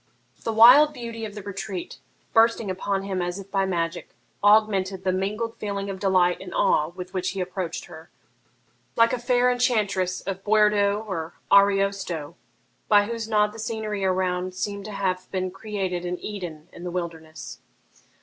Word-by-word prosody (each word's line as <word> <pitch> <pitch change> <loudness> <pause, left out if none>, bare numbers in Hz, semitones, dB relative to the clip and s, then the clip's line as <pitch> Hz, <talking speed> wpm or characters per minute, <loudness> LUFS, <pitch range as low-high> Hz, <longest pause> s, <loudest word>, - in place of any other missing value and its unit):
The 225 - -2
wild 255 +7 +8
beauty 230 -2 -6
of 210 -1 -8
the 205 - -7
retreat, 195 -2 -6 0.3
bursting 225 -3 +3
upon 195 +1 -2
him 190 -2 -2
as 175 +1 -3
if 195 0 -10
by 195 -1 +1
magic, 170 -1 -2 0.3
augmented 200 -3 +3
the 185 - +1
mingled 210 +5 -2
feeling 200 -2 -3
of 190 - -7
delight 185 -3 +2
and 185 -2 -8
awe 150 - +3
with 180 +2 -9
which 185 -1 -1
he 195 - -5
approached 180 -2 -4
her, 160 -2 -13 0.9
like 230 0 +4
a 250 - -1
fair 245 0 +3
enchantress 205 -7 0
of 195 0 -5
Boiardo 210 0 +3
or 165 -5 -4 0.2
Ariosto, 195 -6 +2 0.5
by 205 -1 +5
whose 230 0 -4
nod 210 -1 +3
the 225 - -10
scenery 215 -2 -3
around 185 -1 0
seemed 200 +1 -4
to 215 - -6
have 185 -2 -2
been 185 -1 -2
created 195 -3 -4
an 180 0 -3
Eden 175 -7 -7
in 170 - -10
the 180 - -4
wilderness. 165 -3 -6
195 Hz, 165 wpm, -25 LUFS, 185-215 Hz, 0.9 s, wild